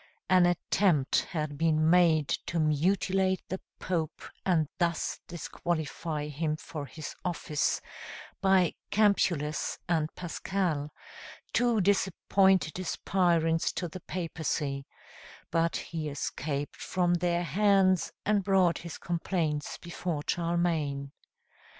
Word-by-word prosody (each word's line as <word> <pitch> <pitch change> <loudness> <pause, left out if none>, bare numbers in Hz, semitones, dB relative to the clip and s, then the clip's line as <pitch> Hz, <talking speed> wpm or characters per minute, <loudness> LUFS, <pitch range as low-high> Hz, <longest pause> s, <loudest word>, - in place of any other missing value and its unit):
An 180 -1 +6
attempt 175 -4 +2
had 150 -4 -3
been 155 -1 +3
made 165 -4 +5 0.2
to 170 - -1
mutilate 185 +4 +2
the 190 - -4 0.2
Pope, 165 -4 -2 0.2
and 165 -5 +2
thus 170 -2 0
disqualify 160 -2 -3
him 150 +1 -1
for 155 -2 -7
his 155 0 -7
office, 165 -4 0 0.6
by 190 -3 +4 0.2
Campulus 175 -8 +2
and 160 -3 +1
Paschal, 175 -4 -2 0.6
two 240 -3 +3
disappointed 190 -2 +2
aspirants 170 -3 +1
to 175 - -2
the 175 +3 -8
papacy; 155 -5 -3 0.6
but 165 0 +1
he 160 -2 -4
escaped 145 0 -3
from 180 -1 0
their 175 0 +1
hands 190 +2 +3
and 205 -1 +2
brought 185 -4 +3
his 170 -2 -7
complaints 165 -3 -2
before 170 -3 -4
Charlemagne. 165 -5 0
170 Hz, 105 wpm, -29 LUFS, 155-185 Hz, 0.6 s, An